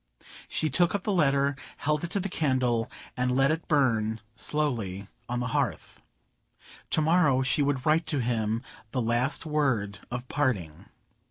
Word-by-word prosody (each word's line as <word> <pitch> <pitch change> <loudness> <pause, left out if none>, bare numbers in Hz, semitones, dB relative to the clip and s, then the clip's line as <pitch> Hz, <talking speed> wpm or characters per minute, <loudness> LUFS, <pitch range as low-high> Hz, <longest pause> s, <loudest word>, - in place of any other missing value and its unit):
She 160 - 0
took 175 +7 +4
up 200 - -2
the 210 - 0
letter, 140 -5 +2 0.2
held 150 +1 0
it 170 - -2
to 200 - 0
the 195 - -2
candle, 130 - 0 0.3
and 125 0 0
let 135 +2 +4
it 160 +1 -3
burn 115 -7 +2 0.2
slowly 115 -9 -1 0.2
on 125 0 -1
the 125 - -2
hearth. - - -2 0.9
To - - +2
morrow 155 -5 +3
she 130 +3 +2
would 140 -2 0
write 160 +1 +3
to 155 - 0
him 115 -2 0 0.3
the 125 - -2
last 120 +7 +1
word 130 -10 0
of 125 +1 -5
parting. 100 - -1
135 Hz, 160 wpm, -28 LUFS, 115-150 Hz, 0.9 s, took